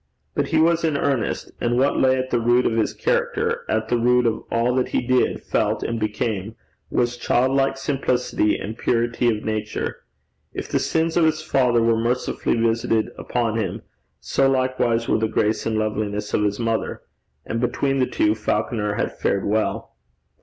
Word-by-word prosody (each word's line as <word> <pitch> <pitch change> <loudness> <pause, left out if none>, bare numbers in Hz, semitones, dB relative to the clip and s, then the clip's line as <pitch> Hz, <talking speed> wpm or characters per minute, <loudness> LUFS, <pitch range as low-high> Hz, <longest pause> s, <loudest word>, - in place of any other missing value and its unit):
But - - 0
he 160 - +1
was 165 +1 +3
in 155 -3 +1
earnest, 135 -5 -1
and 120 0 +1
what 135 +3 +2
lay 130 0 +4
at 130 0 -3
the 120 - +2
root 120 +2 +3
of - - +2
his 110 -2 +1
character, - - -1
at 110 0 0
the 120 +1 +1
root 125 +1 +3
of 115 -1 0
all 120 +2 +1
that 130 0 +1
he - - 0
did, 130 0 +1
felt, - - 0
and 115 -1 -2
became, 110 -1 -2 0.3
was 120 0 0
childlike 135 +3 +1
simplicity 130 -5 0
and 110 +3 -6
purity 120 +1 +1
of 110 -2 -1
nature. 110 -1 -3 0.6
If - - -4
the - - +1
sins 165 +1 0
of 170 - +5
his 155 0 +1
father 125 -6 +2
were 115 -1 +3
mercifully 120 +2 0
visited 115 -1 +1
upon 115 -2 -1
him, 105 - -3 0.4
so 135 0 +1
likewise 130 -3 +1
were - - +2
the 110 - +1
grace 110 0 0
and 110 -1 0
loveliness 105 -1 -2
of 105 - +2
his 105 +1 -1
mother. 115 -1 -2 0.4
And 115 - -3
between 135 +2 0
the 130 - +2
two, 105 - +2
Falconer 105 -1 -1
had - - -2
fared 100 - 0
well. 110 +1 -1
120 Hz, 180 wpm, -22 LUFS, 110-130 Hz, 0.6 s, of